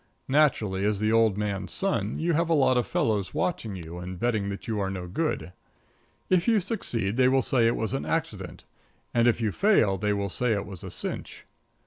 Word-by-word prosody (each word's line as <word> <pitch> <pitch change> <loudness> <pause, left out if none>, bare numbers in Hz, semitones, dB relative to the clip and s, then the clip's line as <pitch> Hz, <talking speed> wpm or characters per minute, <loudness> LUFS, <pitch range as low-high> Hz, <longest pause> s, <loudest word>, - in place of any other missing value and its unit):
Naturally, 125 -10 +2
as 105 -1 +1
the 110 +1 +1
old 115 -3 +3
man's 100 -3 -3
son, 115 - -1
you 170 +1 0
have 165 +2 +1
a 165 - +4
lot 135 -3 +4
of 125 - +1
fellows 105 -4 0
watching 115 - -1
you 85 -1 -8
and 90 +1 -6
betting 110 -4 0
that 100 - -6
you 110 -2 -1
are 95 -1 -1
no 95 -2 -5
good. 90 - -2 0.7
If 185 +1 +2
you 225 -2 +4
succeed 120 - -2
they 130 -1 +5
will 130 0 +3
say 120 -2 +3
it 115 - +2
was 110 +2 -2
an 135 - -1
accident; 115 - -3 0.5
and 120 0 +3
if 120 - +3
you 110 -2 +1
fail 110 - +3
they 105 +2 0
will 100 -1 -1
say 125 +2 +1
it 100 -1 -2
was 95 -4 -9
a - - -6
cinch. - - -6
110 Hz, 210 wpm, -27 LUFS, 100-135 Hz, 0.7 s, they